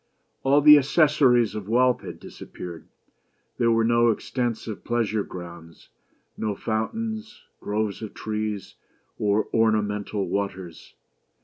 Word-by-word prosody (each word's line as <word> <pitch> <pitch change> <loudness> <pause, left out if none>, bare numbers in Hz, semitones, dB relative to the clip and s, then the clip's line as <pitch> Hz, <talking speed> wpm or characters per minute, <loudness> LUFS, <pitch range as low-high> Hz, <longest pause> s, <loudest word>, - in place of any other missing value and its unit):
All 140 +2 +4
the 150 0 +9
accessories 135 - +3
of 105 -1 -6
wealth 125 +2 +3
had - - -9
disappeared. 85 -2 -10 0.7
There 115 - +3
were 115 0 +3
no 120 +1 +3
extensive 115 -1 -3
pleasure 115 -3 0
grounds, 85 -3 -10 0.5
no 105 -2 -2
fountains, 220 - -4 0.2
groves 105 0 -2
of 110 - -7
trees, 105 -2 -4 0.5
or 105 +1 +1
ornamental 105 -2 0
waters. 95 -4 -5
110 Hz, 110 wpm, -25 LUFS, 105-125 Hz, 0.7 s, the